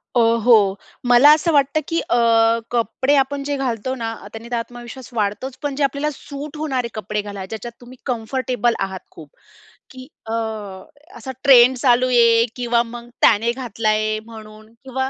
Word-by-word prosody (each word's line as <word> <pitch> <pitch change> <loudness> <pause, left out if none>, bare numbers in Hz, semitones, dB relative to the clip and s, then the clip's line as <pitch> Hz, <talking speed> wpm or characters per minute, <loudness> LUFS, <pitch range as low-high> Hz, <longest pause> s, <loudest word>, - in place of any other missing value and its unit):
अ, - - +4 0.2
हो, 210 -5 +5 0.3
मला 245 +4 +7
असं 315 +2 +1
वाटतं 280 +1 +2
की 330 0 -1
अ, - - +2 0.6
कपडे 260 +4 +1
आपण 275 +1 0
जे 285 - 0
घालतो 255 -2 -2
ना, 225 -2 -4 0.2
त्याने 225 +1 -9
तर - - 0
आत्मविश्वास 240 +2 -7
वाढतोच, 225 +4 -3
पण 285 -2 -2
जे 290 - -1
आपल्याला 280 +2 0
सूट 285 +1 -9
होणारे 265 -6 -2
कपडे 210 0 -3
घाला 200 -2 -7
ज्याच्यात 220 +4 -7
तुम्ही 245 +1 -13
कम्फर्टेबल 245 -1 -1
आहात 190 -1 -3
खूप - - -13 0.6
की 255 0 -11 0.2
अ, - - -2 0.8
असा 265 - -7
ट्रेंड 260 -2 +7
चालू 250 0 +3
आहे 235 -2 +4
किंवा 240 -1 +1
मग 240 0 -9
त्याने 225 +2 +4
घातला 235 -3 -3
आहे 215 0 0
म्हणून 215 -1 -13
किंवा 265 0 -3
240 Hz, 165 wpm, -20 LUFS, 225-265 Hz, 0.8 s, मला